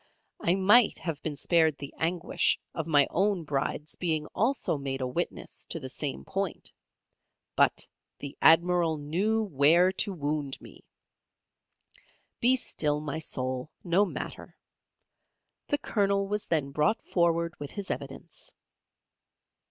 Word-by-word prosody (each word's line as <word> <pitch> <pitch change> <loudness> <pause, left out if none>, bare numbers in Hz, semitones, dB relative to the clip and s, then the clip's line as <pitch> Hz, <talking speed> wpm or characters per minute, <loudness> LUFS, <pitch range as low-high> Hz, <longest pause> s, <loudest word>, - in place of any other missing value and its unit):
I 170 - +2
might 205 +4 +5
have 160 -4 -5
been 155 -2 -3
spared 160 0 +2
the 140 - -8
anguish 170 +1 0
of 160 -1 -4
my 145 -3 +5
own 195 -1 +1
Bride's 150 +1 -3
being 160 -4 -1
also 245 - +1
made 135 -1 -3
a 130 - -1
witness 130 +8 -3
to 165 - -5
the 130 -3 -7
same 140 +1 -4
point, 195 -3 -3 0.8
but - - +2 0.3
the 140 -1 -7
Admiral 170 0 +4
knew 190 +10 0
where 170 +1 +4
to 200 +2 +2
wound 145 -4 -3
me. - - -14 1.6
Be 250 +2 +5
still 150 - 0
my 150 0 -4
soul, 130 -2 -2
no 180 +3 +3
matter. 205 - -6 1.1
The 290 - +1
Colonel 200 -7 0
was 210 +1 -2
then 150 -4 0
brought 150 +10 +1
forward 170 -1 +1
with 145 - -6
his 200 -2 -5
evidence. - - -7
165 Hz, 130 wpm, -28 LUFS, 145-195 Hz, 1.6 s, might